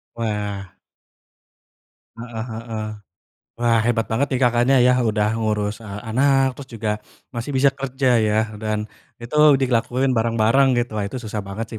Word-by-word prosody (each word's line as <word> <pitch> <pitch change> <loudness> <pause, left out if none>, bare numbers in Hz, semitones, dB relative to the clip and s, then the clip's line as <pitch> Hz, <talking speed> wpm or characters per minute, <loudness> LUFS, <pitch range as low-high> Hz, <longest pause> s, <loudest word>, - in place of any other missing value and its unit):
Wah. 105 -4 -3 1.4
Heeh 115 -1 -6
heeh. 110 -1 -5 0.7
Wah, 120 -1 +2
hebat 115 -3 +1
banget 120 +6 +1
nih 130 - -1
Kakaknya 120 +2 +3
yah, 125 +1 +4
udah 110 -3 +1
ngurus, 105 -1 -1
eee, 105 -2 -8
anak, 135 +1 +2
terus 140 -1 -9
juga 110 -1 -2 0.4
masih 120 +3 -5
bisa 135 +1 +4
kerja 135 -2 0
ya, 110 -1 +2 0.2
dan 110 0 -3 0.3
itu 120 +6 -5 0.2
dilakuin 130 0 +1
bareng-bareng 115 +3 +3
gitu. 120 -3 -1
Wah, 100 - -1
itu 125 +4 -6
susah 110 -1 -5
banget 105 +3 -5
sih 110 - -6
115 Hz, 150 wpm, -21 LUFS, 110-125 Hz, 1.4 s, yah